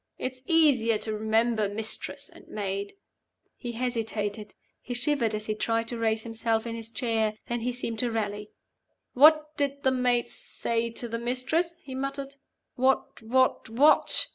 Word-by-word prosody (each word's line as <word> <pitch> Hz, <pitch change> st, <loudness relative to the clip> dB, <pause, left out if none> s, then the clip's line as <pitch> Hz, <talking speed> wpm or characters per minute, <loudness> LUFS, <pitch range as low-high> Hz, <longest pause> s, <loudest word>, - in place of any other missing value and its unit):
It's 255 Hz, 0 st, -5 dB
easier 275 Hz, -9 st, +4 dB
to 215 Hz, +1 st, -1 dB
remember 220 Hz, 0 st, +1 dB
Mistress 215 Hz, +2 st, -3 dB
and -, -, -15 dB
Maid 200 Hz, -, -4 dB, 0.3 s
" -, -, -49 dB
He 240 Hz, -2 st, -6 dB
hesitated; 220 Hz, -4 st, -3 dB, 0.3 s
he 245 Hz, -, -5 dB
shivered 245 Hz, -4 st, 0 dB
as 215 Hz, 0 st, -4 dB
he 215 Hz, -, -1 dB
tried 225 Hz, +1 st, -1 dB
to 240 Hz, -, -3 dB
raise 220 Hz, -1 st, +1 dB
himself 225 Hz, 0 st, -1 dB
in 230 Hz, -, -4 dB
his 225 Hz, -1 st, -4 dB
chair. 225 Hz, -3 st, 0 dB
Then 240 Hz, 0 st, -1 dB
he 245 Hz, +2 st, -1 dB
seemed 230 Hz, -2 st, -4 dB
to 245 Hz, -, +2 dB
rally 210 Hz, -1 st, -3 dB, 0.6 s
"What 305 Hz, +2 st, +6 dB
did 280 Hz, -1 st, -1 dB
the 265 Hz, -, +4 dB
Maid 250 Hz, -2 st, +1 dB
say 230 Hz, 0 st, -2 dB
to 235 Hz, +1 st, -2 dB
the 230 Hz, 0 st, -3 dB
Mistress?" 260 Hz, +8 st, 0 dB
he 265 Hz, -, -8 dB
muttered. 275 Hz, +1 st, -4 dB, 0.4 s
"What? 260 Hz, +1 st, +1 dB
what? 255 Hz, +1 st, +2 dB
what?" 280 Hz, +7 st, +5 dB
235 Hz, 165 wpm, -27 LUFS, 220-260 Hz, 0.6 s, What